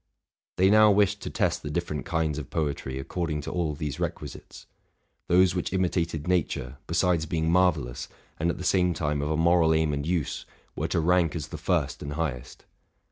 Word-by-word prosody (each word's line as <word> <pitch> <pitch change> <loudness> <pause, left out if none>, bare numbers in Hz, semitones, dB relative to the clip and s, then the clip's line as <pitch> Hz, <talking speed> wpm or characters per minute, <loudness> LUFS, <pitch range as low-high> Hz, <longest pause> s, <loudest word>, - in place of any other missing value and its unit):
They 95 +2 +4
now 110 0 +7
wished 100 0 +3
to - - -5
test - - 0
the 75 - -5
different 75 -4 -3
kinds 80 -3 0
of 70 - -8
poetry 70 -4 -2
according 75 +2 -3
to - - -6
all 80 -4 -1
these 75 -2 -4
requisites: - - -6 0.6
those 90 0 +4
which 90 - -2
imitated 85 -4 -1
nature, 75 -7 -1
besides 85 -1 +1
being 80 0 0
marvellous, 80 -9 +1 0.3
and 85 +2 +1
at - - -2
the - - -6
same 90 -2 +2
time 75 -2 -1
of 75 - -2
a 80 - 0
moral 80 -1 +4
aim 80 -1 +1
and 70 0 -2
use, 85 -4 -2 0.3
were - - -2
to - - 0
rank 85 0 +2
as 80 - -5
the - - -6
first - - -1
and 70 0 -5
highest. 70 -6 -4
80 Hz, 190 wpm, -27 LUFS, 75-90 Hz, 0.6 s, now